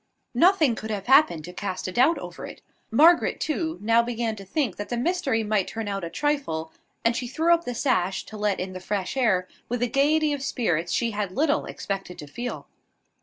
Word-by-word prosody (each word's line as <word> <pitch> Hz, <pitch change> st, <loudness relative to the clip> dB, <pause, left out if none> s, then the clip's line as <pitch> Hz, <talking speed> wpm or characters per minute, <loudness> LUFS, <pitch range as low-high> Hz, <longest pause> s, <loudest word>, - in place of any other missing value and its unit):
Nothing 335 Hz, -8 st, +4 dB
could 220 Hz, 0 st, -6 dB
have 205 Hz, -3 st, -3 dB
happened 265 Hz, -, +4 dB
to 180 Hz, -, -9 dB
cast 190 Hz, -1 st, -4 dB
a -, -, -3 dB
doubt 260 Hz, -, +3 dB
over -, -, -8 dB
it. -, -, -12 dB, 0.3 s
Margaret, 320 Hz, +9 st, +5 dB
too, 320 Hz, +1 st, -2 dB
now 230 Hz, +2 st, +4 dB
began 235 Hz, -1 st, -2 dB
to 195 Hz, -, -8 dB
think 215 Hz, -, -2 dB
that 205 Hz, -, -5 dB
the 240 Hz, -, -2 dB
mystery 270 Hz, -5 st, 0 dB
might 210 Hz, -3 st, 0 dB
turn 225 Hz, -1 st, -5 dB
out 195 Hz, -2 st, -3 dB
a 170 Hz, -, -3 dB
trifle; 270 Hz, -, -2 dB, 0.3 s
and 230 Hz, 0 st, +3 dB
she 245 Hz, -, -3 dB
threw 325 Hz, +7 st, +2 dB
up 340 Hz, 0 st, +1 dB
the 245 Hz, -, -4 dB
sash, 195 Hz, -8 st, 0 dB
to 220 Hz, -, -11 dB
let 210 Hz, -2 st, 0 dB
in 185 Hz, +1 st, -4 dB
the 185 Hz, -, -6 dB
fresh 195 Hz, +2 st, -3 dB
air, 200 Hz, -9 st, +2 dB, 0.2 s
with 245 Hz, 0 st, -1 dB
a -, -, +2 dB
gaiety 295 Hz, +4 st, +2 dB
of 285 Hz, -, -4 dB
spirits 175 Hz, -, -1 dB
she 235 Hz, -1 st, +1 dB
had 205 Hz, -3 st, -3 dB
little 295 Hz, +3 st, +1 dB
expected 195 Hz, -3 st, -5 dB
to 150 Hz, -, -8 dB
feel. 240 Hz, +12 st, -6 dB
230 Hz, 215 wpm, -25 LUFS, 195-285 Hz, 0.3 s, Margaret